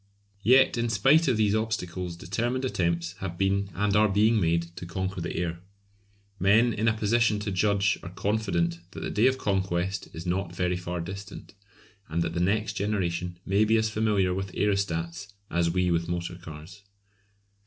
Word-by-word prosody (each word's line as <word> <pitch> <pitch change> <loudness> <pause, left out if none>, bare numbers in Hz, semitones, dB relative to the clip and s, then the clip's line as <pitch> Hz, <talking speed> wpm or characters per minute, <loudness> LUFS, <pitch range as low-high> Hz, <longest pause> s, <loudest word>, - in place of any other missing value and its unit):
Yet 130 +4 +5
in 120 0 0
spite 135 +10 +4
of 125 -4 +2
these 105 -2 +2
obstacles 90 -5 -2
determined 120 +9 -2
attempts 85 -7 -1
have 90 -3 -5
been 100 +1 +1
and 105 +1 +1
are 105 0 +5
being 105 +2 +3
made 85 0 0
to 90 - -6
conquer 95 +1 -3
the 85 - -4
air. 85 -1 -2 0.8
Men 110 +5 +4
in 110 +2 -1
a 110 -1 +2
position 110 0 +2
to 105 -1 -3
judge 100 +1 +2
are 85 - -7
confident 95 -4 -1
that - - -7
the - - -3
day 110 +5 +4
of 130 0 +2
conquest 95 -4 -1
is 80 +2 -8
not 90 0 -2
very 90 0 0
far 90 -1 -4
distant, 95 +4 -8 0.6
and 85 +2 0
that 80 0 -3
the 85 - -2
next 105 +5 +1
generation 90 -4 -2
may 100 +2 +3
be 110 +1 +3
as 110 0 +1
familiar 105 -4 +1
with 95 0 -4
aerostats 100 -1 -1 0.2
as 85 -1 +2
we 90 +1 +1
with 85 0 0
motor 85 0 -3
cars. 85 +2 -11
95 Hz, 175 wpm, -27 LUFS, 85-105 Hz, 0.8 s, Yet